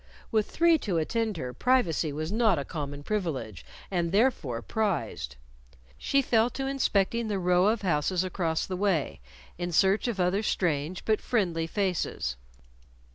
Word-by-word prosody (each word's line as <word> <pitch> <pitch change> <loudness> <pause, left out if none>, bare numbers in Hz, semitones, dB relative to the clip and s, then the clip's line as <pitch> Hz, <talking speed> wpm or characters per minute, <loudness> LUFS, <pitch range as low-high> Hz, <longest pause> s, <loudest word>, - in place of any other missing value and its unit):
With 215 -2 +1
three 335 -1 +4
to 190 -9 -1
attend 220 +5 -1
her, 125 -5 -5
privacy 175 - +1
was 155 +4 -4
not 220 -3 +3
a 140 - -3
common 145 -3 -5
privilege, 150 - -3 0.3
and, 170 -3 0
therefore, 175 - +1
prized. 115 - -2 0.6
She 275 - +1
fell 230 -1 +3
to 270 +2 -4
inspecting 235 -4 +1
the 205 -2 -1
row 180 0 +3
of 215 -1 +1
houses 175 +1 +1
across 170 -3 -1
the 185 - -4
way 180 - 0 0.4
in 175 0 -2
search 195 +7 +3
for 215 -5 -3
other 185 +3 +1
strange 175 -4 -1
but 215 -1 +1
friendly 175 -8 0
faces. 180 - -1
185 Hz, 150 wpm, -28 LUFS, 160-220 Hz, 0.6 s, three